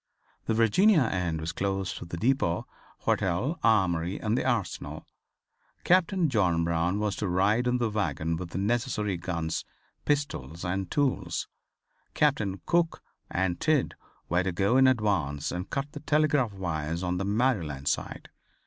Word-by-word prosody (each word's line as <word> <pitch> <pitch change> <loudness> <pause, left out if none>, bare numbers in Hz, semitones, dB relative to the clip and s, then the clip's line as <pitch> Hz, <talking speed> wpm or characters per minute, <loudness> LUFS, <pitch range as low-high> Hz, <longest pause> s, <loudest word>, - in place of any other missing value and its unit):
The 110 - +1
Virginia 155 - +5
end 90 -7 -1
was 80 +1 -3
close 95 +1 -2
to - - -7
the 85 0 -6
depot, 115 -6 +1 0.4
hotel, 115 - 0
Armory 95 -5 +2
and 110 +1 0
the - - 0
Arsenal. 120 -8 -2 0.8
Captain 185 0 +3
John 90 - +2
Brown 85 +3 0
was 105 -1 -1
to 105 - -1
ride 100 +7 +2
in 125 0 +2
the 120 -2 +1
wagon 85 -6 -1
with 85 +1 -5
the 85 - -5
necessary 105 -1 0
guns, 85 -2 -3 0.4
pistols 90 - -2
and 95 +1 -2
tools. 140 -3 0 0.7
Captains 110 -10 +1
Cook 170 -1 +1 0.3
and 90 -1 -1
Tidd 155 -4 +2 0.3
were 90 +2 +2
to 95 0 -1
go 100 +7 +1
in 130 0 +6
advance 100 - +1
and 90 +2 -4
cut 140 +1 -3
the 145 - -7
telegraph 150 -5 +2
wires 85 -3 -3
on 90 0 -1
the - - -1
Maryland 100 - 0
side. - - -2
100 Hz, 150 wpm, -28 LUFS, 85-125 Hz, 0.8 s, in